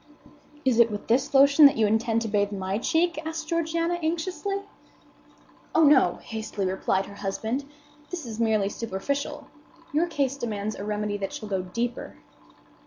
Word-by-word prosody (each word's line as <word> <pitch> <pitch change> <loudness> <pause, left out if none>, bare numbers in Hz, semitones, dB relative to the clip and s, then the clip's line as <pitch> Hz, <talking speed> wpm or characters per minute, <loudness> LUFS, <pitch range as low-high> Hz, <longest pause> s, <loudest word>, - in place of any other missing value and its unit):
"Is 250 -3 +3
it 235 -1 +6
with 205 -1 -5
this 265 +5 +2
lotion 280 +2 +8
that 280 - 0
you 220 - +4
intend 225 +2 +1
to - - -3
bathe 205 -1 +1
my 195 0 -2
cheek?" 335 +5 +1
asked 320 0 -5
Georgiana, 335 +1 0
anxiously. 365 +5 -2 1.1
"Oh, 320 - +6
no," 275 - +5
hastily 220 -3 -4
replied 190 +1 0
her - - -11
husband; 220 +7 -3 0.4
"this 350 -5 -5
is 225 -1 -7
merely 220 -3 +2
superficial. 280 +9 -3 0.5
Your 320 +4 +2
case 280 -5 -1
demands 215 -4 -3
a - - -6
remedy 210 0 -2
that 195 -1 -4
shall 215 - -7
go 190 -2 0
deeper." 235 +7 -4
235 Hz, 160 wpm, -26 LUFS, 205-305 Hz, 1.1 s, lotion